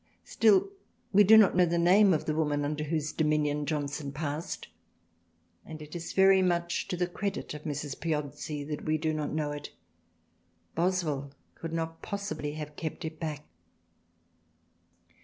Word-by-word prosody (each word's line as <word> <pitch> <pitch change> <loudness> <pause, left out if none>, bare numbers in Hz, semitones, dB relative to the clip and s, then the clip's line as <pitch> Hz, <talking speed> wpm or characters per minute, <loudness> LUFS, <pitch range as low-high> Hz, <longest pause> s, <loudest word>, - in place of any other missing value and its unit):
Still 215 - +4 0.5
we 205 +2 +7
do 220 +3 +8
not 210 -5 +6
know 180 -1 +5
the 170 +1 0
name 190 +4 +6
of 155 - +1
the 155 - 0
woman 150 -2 0
under 150 +1 -2
whose 155 -1 -1
dominion 150 -2 +1
Johnson 145 -1 -2
passed, 150 +4 -4 1.0
and 155 -1 -9
it 150 +2 -10
is 170 -1 -5
very 190 0 +6
much 170 -1 0
to 180 - -3
the 180 - +1
credit 195 +1 -4
of 150 +1 -9
Mrs. 145 -2 -4
Piozzi 150 -1 -3
that 150 0 -5
we 155 0 +1
do 155 0 -1
not 155 -1 -2
know 150 -1 -1
it. 145 0 -6 1.0
Boswell 160 -6 -1 0.2
could 165 - -7
not 165 0 -3
possibly 200 -8 -4
have 150 -1 -7
kept 160 +2 -5
it 160 0 -6
back. 150 -2 -4
155 Hz, 160 wpm, -29 LUFS, 150-175 Hz, 1.0 s, do